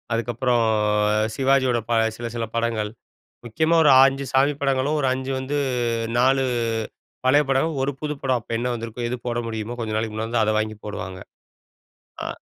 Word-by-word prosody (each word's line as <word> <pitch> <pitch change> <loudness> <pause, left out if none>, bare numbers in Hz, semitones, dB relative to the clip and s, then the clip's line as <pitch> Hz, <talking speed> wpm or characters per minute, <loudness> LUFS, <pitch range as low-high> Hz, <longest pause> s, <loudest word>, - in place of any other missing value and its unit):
அதுக்கப்பறம் 120 +1 +1 0.7
சிவாஜியோட 130 -2 +2
ப - - -2 0.3
சில 120 - -4
சில 115 -1 -2
படங்கள், 115 -2 -1 0.6
முக்கியமா 160 +8 +1
ஒரு 145 - +6
5 135 +1 +2
சாமி 135 +2 +4
படங்களும் 135 +2 +1
ஒரு 135 - +1
5 130 +1 -4
வந்து 135 +3 -2 0.6
4 135 +2 +3 0.8
பழைய 145 +3 +5
படம், 140 +4 +1
1 140 - 0
புது 150 -1 -2
படம், 130 -2 +1
அப்போ 110 - -7
என்ன 125 +1 -1
வந்துருக்கோ, 115 +1 -5
எது 125 - -3
போட 120 -1 -1
முடியுமோ, 110 +1 -5
கொஞ்ச 110 -2 -3
நாளைக்கு 110 0 -2
முன்னால 110 +1 -3
வந்த 115 -1 +2
அத 110 - +1
வாங்கி 110 0 -2
போடுவாங்க. 95 -3 -6 1.1
ஆ - - -4
125 Hz, 165 wpm, -23 LUFS, 115-135 Hz, 1.1 s, ஒரு